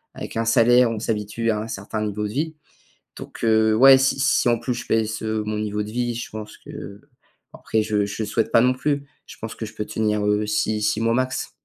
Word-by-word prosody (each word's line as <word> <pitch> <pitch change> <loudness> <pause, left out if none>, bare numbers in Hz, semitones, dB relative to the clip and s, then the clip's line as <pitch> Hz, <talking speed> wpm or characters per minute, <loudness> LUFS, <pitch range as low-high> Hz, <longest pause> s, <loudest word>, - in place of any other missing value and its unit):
avec - - -7
un 115 - 0
salaire 120 +2 +5
on 110 - -3
s'habitue 110 +1 -1
à 105 - -1
un 110 - -6
certain 105 0 -4
niveau 105 0 -2
de 105 - -8
vie. 155 +4 -2 0.6
Donc, - - -10
heu, 110 -1 +4
ouais 135 +3 +8
si 135 0 +2
si, 135 -2 +2
en 120 - +2
plus, 120 +1 -2
je 120 - -7
baisse, 110 -1 0
heu, 110 -1 -1
mon 105 0 -2
niveau 105 0 -2
de 105 - -8
vie 120 +1 -1
je 120 - -5
pense 105 0 -8
que. - - -13 0.8
Bon, - - -12
après 110 - 0
je 105 -1 0
je 100 +2 -4
souhaite 110 +2 -1
pas 115 - +5
non 125 +1 +4
plus, 140 +1 -1 0.2
je - - -12
pense - - -6
que - - -5
je - - -12
peux 105 - -3
tenir, 105 -1 -1
heu, 105 +1 +1
6-6 105 0 0
mois 115 0 +2
max. 130 0 -1
110 Hz, 235 wpm, -23 LUFS, 105-120 Hz, 0.8 s, ouais